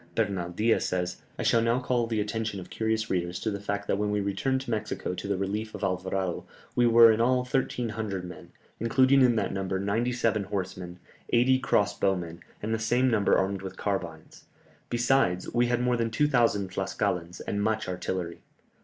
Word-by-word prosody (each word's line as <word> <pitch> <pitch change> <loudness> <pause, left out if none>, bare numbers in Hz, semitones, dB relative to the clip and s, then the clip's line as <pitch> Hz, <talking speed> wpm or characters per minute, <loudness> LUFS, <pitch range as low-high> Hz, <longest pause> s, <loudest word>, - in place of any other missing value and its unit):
Bernal 90 -3 -1
Diaz 110 +6 +1
says, 90 -1 -2 0.2
"I - - -3
shall 115 - +3
now 115 +2 +2
call 125 -2 0
the 115 -2 -1
attention 110 -1 -2
of 90 - -11
curious 110 0 -1
readers 90 -1 -1
to 110 - -1
the 100 - -4
fact 100 0 -3
that 100 - 0
when 105 0 0
we 105 0 0
returned 130 +7 -1
to 130 - -6
Mexico 110 -4 -2
to 90 - -5
the 100 -1 0
relief 105 +3 -3
of - - -7
Alvarado, 95 -1 -1 0.3
we 120 -1 +4
were 115 0 +8
in 110 +1 +1
all 125 +1 +2
1300 110 -7 -2
men, 90 -3 -11 0.3
including 130 +4 +4
in 125 -2 +5
that 110 - -1
number 95 -1 -2
ninety 110 +5 0
seven 115 -4 0
horsemen, 95 -3 -5 0.3
eighty 130 +2 +4
cross 105 -5 +1
bowmen, 90 -4 -1 0.2
and 110 +2 -1
the 110 - 0
same 120 +3 +2
number 105 -3 +3
armed 95 0 -1
with 95 -1 -7
carbines; 85 -6 -4 0.4
besides, 120 -7 +1
we 120 0 +3
had 120 0 +1
more 125 -1 +2
than 115 -1 0
2000 115 -6 +2
Tlascalans, 90 -1 -2
and 100 - -3
much 110 0 0
artillery. 90 -1 -4
105 Hz, 190 wpm, -28 LUFS, 95-120 Hz, 0.4 s, were